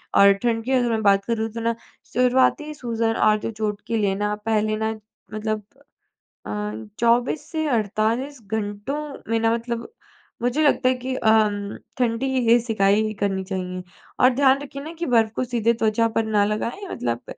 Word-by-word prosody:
और 200 0 +8
ठंड 225 -1 +1
की 265 - -2
अगर 245 -2 +2
मैं 220 -1 0
बात 200 -1 +4
करूँ 225 -1 -1
तो 230 - -4
ना 230 0 0 0.4
शुरुआती 255 +5 +2
सूजन 230 -4 -1
और 215 0 +4
जो 230 - -4
चोट 210 -1 -3
के 230 - 0
लिए 200 -2 +1
ना 210 +1 -1
पहले 215 -1 +1
ना 220 0 -1 0.4
मतलब 215 0 -2 0.8
अ, - - -7 0.5
24 240 +5 +2
से 315 -1 -1
48 230 +5 0
घंटों 205 +5 -3 0.4
में 230 - +2
ना 225 0 +2
मतलब, 235 0 -3 0.5
मुझे 250 +6 +1
लगता 275 -3 +3
है 255 - +2
कि 255 +1 -4
अ, 220 - +1
उम, 205 -2 +2 0.2
ठंडी 240 +1 0 0.2
ही 240 +1 +7
सिकाई 215 -1 +1
करनी 195 -1 0
चाहिए। 185 -1 -4 0.4
और 255 - +7
ध्यान 275 0 +4
रखिए 280 0 -7
ना 320 +2 -7
कि 340 - -1
बर्फ़ 225 -3 +3
को - - 0
सीधे 235 -2 +1
त्वचा 225 0 +1
पर 225 - +2
ना 210 -2 +2
लगाएँ 230 - -3
मतलब 120 0 -3
225 Hz, 180 wpm, -23 LUFS, 210-245 Hz, 0.8 s, और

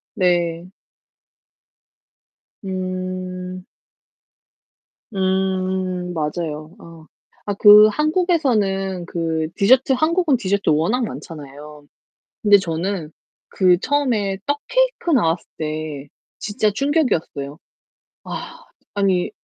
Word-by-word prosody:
네. 175 -2 0 2.0
음. 185 -1 -5 1.5
음 185 -1 -1
맞아요. 155 +1 -4
아 165 -1 -14 0.4
아 - - 0
그 210 0 +9
한국에서는 220 - 0
그 160 -2 -2
디저트 255 +6 +4
한국은 315 0 +2
디저트 200 -4 -1
워낙 170 +12 +2
많잖아요. 150 -3 -10 0.6
근데 205 -1 +6
저는 170 -1 -3 0.4
그 180 -2 +3
처음에 235 -9 0
떡케이크 485 +6 0
나왔을 170 - +2
때 155 -2 -4 0.3
진짜 210 0 0
충격이었어요. 205 - -1 0.7
아 - - -7 0.3
아니 195 -3 +1
185 Hz, 175 characters per minute, -21 LUFS, 165-215 Hz, 2.0 s, 그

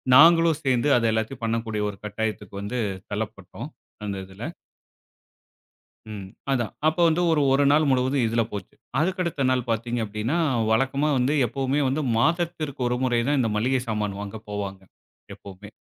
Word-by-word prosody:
நாங்களும் 165 +1 +7
சேர்ந்து 130 +1 +2
அதை 115 -1 +2
எல்லாத்தையும் 110 +2 -3
பண்ணக்கூடிய 110 -2 -1
ஒரு 100 - -8
கட்டாயத்துக்கு 105 -1 -4
வந்து 120 +5 -3 0.3
தள்ளப்பட்டோம். - - -5 0.4
அந்த 100 -1 -3
இதில. 95 +4 -11 1.7
ம். 100 -3 -7 0.2
அதான் 120 -4 0
அப்போ 160 +2 +1
வந்து 165 +2 +2
ஒரு 155 - +3
1 145 - +4
நாள் 150 0 +4
முழுவதும் 130 0 +2
இதில 115 +1 +1
போச்சு. 100 -3 -7 0.2
அதற்கு 185 +3 0
அடுத்த 150 -6 -1
நாள் 125 -1 0
பாத்தீங்க 115 +1 -1
அப்பிடீன்னா, 110 +9 -2 0.3
வழக்கமா 135 +5 +2
வந்து 130 +4 +2
எப்பவுமே 135 +4 0
வந்து 145 +4 0
மாதத்திற்கு 160 -1 0
1 125 - 0
முறை 120 -2 +2
தான் 145 -2 +2
இந்த 115 -3 0
மளிகை 125 +4 +1
சாமான் 105 -2 -2
வாங்க 105 +1 -6
போவாங்க, 100 -2 -4 0.5
எப்பவுமே. 100 +1 -12
125 Hz, 150 wpm, -25 LUFS, 105-145 Hz, 1.7 s, நாங்களும்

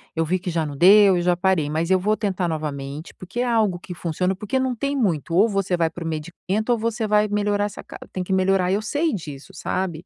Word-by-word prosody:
eu 165 0 +1
vi 185 +4 0
que 180 - -5
já 165 -2 0
não 145 -1 -6
deu 195 +5 +7
e - - 0
já 175 0 +2
parei, 180 -5 +1
mas 160 +4 -1
eu 185 - +4
vou 215 +3 +1
tentar 190 -4 -1
novamente, 150 -1 -5
porque 190 +6 -8
é - - +1
algo 220 -6 +1
que 180 - -8
funciona, 180 +2 -1
porque 210 +7 -2
não 260 -1 -1
tem 280 +4 -2
muito 170 - 0
ou 200 +5 +5
você 195 -4 0
vai 165 -1 +2
para 170 +1 -7
o - - -4
medicamento 175 +7 -3
ou 240 - +3
você 230 0 -1
vai 210 0 +3
melhorar 205 0 0
essa 205 - -7
ca - - -11
tem 185 - -3
que 190 - -2
melhorar, 190 -1 +2
eu 200 +2 +1
sei 290 +8 0
disso, 150 -7 -7
sabe, 180 -3 -3
185 Hz, 250 wpm, -23 LUFS, 165-210 Hz, -, deu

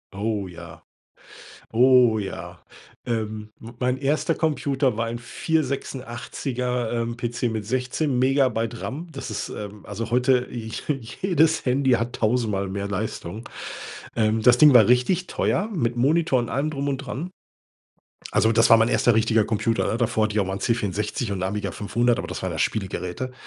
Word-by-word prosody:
Oh 105 -1 -2
ja. 85 -2 -11 0.9
Oh 125 -1 +5
ja! 90 -4 -6 0.4
Ähm, 110 -2 -3
mein 125 +3 -2
1. 150 +4 +1
Computer 140 -6 0
war 115 - 0
ein 115 +1 -4
486er, 125 -3 -2
ähm, 115 0 -2
PC 120 0 -4
mit 110 -3 -1
16 130 +3 -1
Megabyte 125 -3 +1
RAM. 160 +6 -5
Das 135 - -6
ist, 105 -1 -4
ähm, 105 0 -8
also 105 +3 -5
heute 125 +1 +2
j 110 -2 -6 0.5
jedes 160 -4 +3
Handy 130 +1 +2
hat 120 0 +1
tausendmal 110 -4 0
mehr 100 +1 -3
Leistung. 100 +1 -4 0.7
Ähm, 110 -1 +2
das 120 +2 +6
Ding 150 +1 +8
war 115 -4 +7
richtig 125 +10 +2
teuer, 205 +5 0
mit 120 -6 0
Monitor 140 +2 +2
und 120 - -3
allem 145 +3 -1
drum 140 -1 -3
und 140 - 0
dran. 140 +6 -5 1.0
Also 110 - +4
das 115 0 +4
war 115 - +9
mein 115 +1 +3
1. 120 - +3
richtiger 110 0 +3
Computer. 110 +1 0
Da - - 0
davor 115 -2 +1
hatte 110 -1 0
ich 105 - +1
auch 100 - +1
mal 95 - -2
'n - - -5
C 115 - +2
64 105 +1 -2
und 95 -2 -2
Amiga 105 +2 -2
500, 120 +3 +1
aber - - -4
das - - -5
ware - - -2
ja - - -5
Spielegeräte. 95 +3 -2
120 Hz, 170 wpm, -24 LUFS, 110-130 Hz, 1.0 s, war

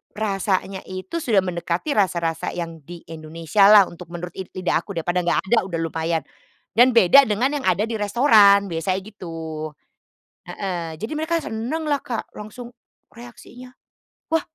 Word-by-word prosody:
rasanya 195 -2 -1
itu 185 - -6
sudah 220 -10 +2
mendekati 175 - -3
rasa-rasa 170 -4 0
yang 165 -2 -5
di 175 -1 -10
Indonesia 165 +5 +1
lah, 210 -1 +9
untuk 175 0 -11
menurut 175 0 -6
lid 185 - -8
lidah 185 -1 0
aku. 200 - -7
Daripada 175 +2 -1
enggak 175 - +2
ada, 225 -5 +3
udah 170 -3 -3
lumayan, 160 -1 -2 0.5
dan 245 +1 +6
beda 235 +7 +7
dengan 235 +7 +1
yang 275 - -6
ada 185 +3 +2
di 225 - -2
restoran 205 -3 +5
biasanya, 185 +4 -1
gitu, 165 -6 -7 0.8
heeh, 175 -5 -4
jadi 220 - -5
mereka 320 +2 -1
seneng 245 +9 -4
lah, 290 -2 +1
Kak, 235 - -5
langsung 235 +3 -9 0.4
reaksinya, 245 +1 -13 0.6
“Wah!” 325 0 +1
195 Hz, 155 wpm, -22 LUFS, 170-230 Hz, 0.8 s, lah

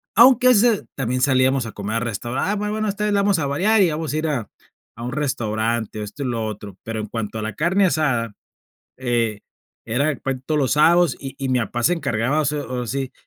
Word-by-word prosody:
Aunque 250 +2 +7
a - - +8
veces 225 -2 +3
también 130 -1 -1
salíamos 130 -1 +3
a 115 - -7
comer 105 +2 -3
a - - +1
restaurante: 120 - -2
"Ah, - - 0
bueno, 215 +1 -1
esta 205 +1 -2
vez 210 - +1
la 200 - +3
vamos 200 -3 +2
a 145 - -1
variar 200 +10 +3
y 185 - +4
vamos 155 -1 -3
a - - 0
ir 155 +1 -1
a 120 -8 -2 0.5
a 115 - -8
un 125 - -3
restaurante", 115 -5 -2
esto 105 +7 -7
y - - -3
lo 115 -2 -2
otro, 105 -3 -7
pero 110 -1 -4
en 105 - -5
cuanto 110 0 -4
a - - -4
la 110 +1 -4
carne 180 +5 +2
asada, 135 - 0 0.7
eh, 120 -5 0 0.5
era 140 +6 0
puen 130 0 -4
todos 155 -1 +1
los 135 -3 +1
sábados 165 0 +4
y 135 -1 -7
y 135 - -3
mi 130 - +2
papá 120 +2 -3
se 175 - +4
encargaba 140 -3 0
hace 150 0 0
o 125 -3 -4
así, 130 +2 -3
135 Hz, 230 wpm, -22 LUFS, 115-160 Hz, 0.7 s, a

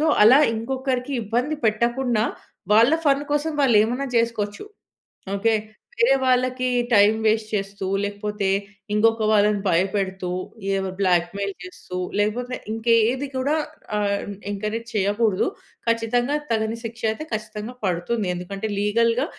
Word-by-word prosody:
So, 315 - +2 0.2
అలా 255 +6 +8 0.2
ఇంకొకరికి 260 +2 -2
ఇబ్బంది 250 +8 -1
పెట్టకుండా, 235 +1 +1 0.5
వాళ్ళ 230 +7 +6 0.2
ఫన్ 280 +1 +2
కోసం 300 +2 0
వాళ్ళేమనా 245 +2 +3
చేసుకోచ్చు. 230 - -1 0.7
ఓకే! 225 +2 +2 0.4
వేరే 235 +3 +4
వాళ్ళకి 255 0 +2 0.2
టైం 205 -1 +6
వేస్ట్ 215 0 +2
చేస్తూ, 195 -1 -3 0.2
లేకపోతే 205 0 -3 0.5
ఇంకొక 225 +1 +3
వాళ్ళని 210 -1 +3
భయపెడుతూ, 190 +1 0 0.5
ఏవో 190 -1 -1
బ్లాక్‌మెయిల్ 185 +2 +1
చేస్తూ, 180 0 -8 0.2
లేకపోతే 245 +5 -1 0.2
ఇంక 225 +1 -7 0.2
యేది 260 +4 -1
కూడా 280 +4 +1 0.4
ఆహ్, 200 -1 0 0.3
ఎంకరేజ్ 215 +3 -3
చేయకూడదు. 205 - +1 0.4
ఖచ్చితంగా 240 +4 +1 0.2
తగని 220 0 0
శిక్ష 230 0 -7
అయితే 310 +8 -6
ఖచ్చితంగా 215 +2 -5
పడుతుంది. 185 +4 -1
ఎందుకంటే, 195 +4 -5
లీగల్‌గా 230 +5 +2
220 Hz, 120 wpm, -23 LUFS, 205-245 Hz, 0.7 s, అలా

